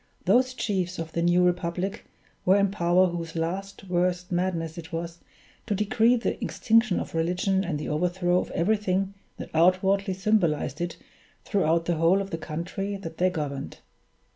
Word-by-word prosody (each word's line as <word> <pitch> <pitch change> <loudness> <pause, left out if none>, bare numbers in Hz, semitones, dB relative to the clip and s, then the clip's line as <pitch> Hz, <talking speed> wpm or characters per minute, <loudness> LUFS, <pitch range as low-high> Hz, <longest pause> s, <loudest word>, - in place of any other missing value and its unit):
Those 255 0 +3
chiefs 185 -6 -2
of 165 -1 -5
the 170 - -1
new 175 +1 +4
republic 180 +2 -1 0.4
were 185 - +5
in 200 -1 +2
power 180 -1 +3
whose 170 -2 -4
last, 185 +5 -3
worst 180 0 0
madness 175 -3 -1
it 160 - -10
was 170 0 -5 0.5
to 210 - 0
decree 225 +4 +3
the 235 - -2
extinction 225 -3 +2
of - - -6
religion 180 +4 +1
and 165 -6 -2
the 150 - -5
overthrow 175 +3 +1
of - - -4
everything 195 0 0 0.2
that - - -8
outwardly 185 +4 +3
symbolized 175 -7 +1
it 175 0 -3 0.5
throughout 165 -4 +1
the 170 -1 0
whole 165 +4 +4
of 195 0 -4
the 165 - -3
country 180 +6 -4
that 165 -4 -9
they 185 +1 +4
governed. 145 -6 -4
180 Hz, 165 wpm, -26 LUFS, 170-195 Hz, 0.5 s, were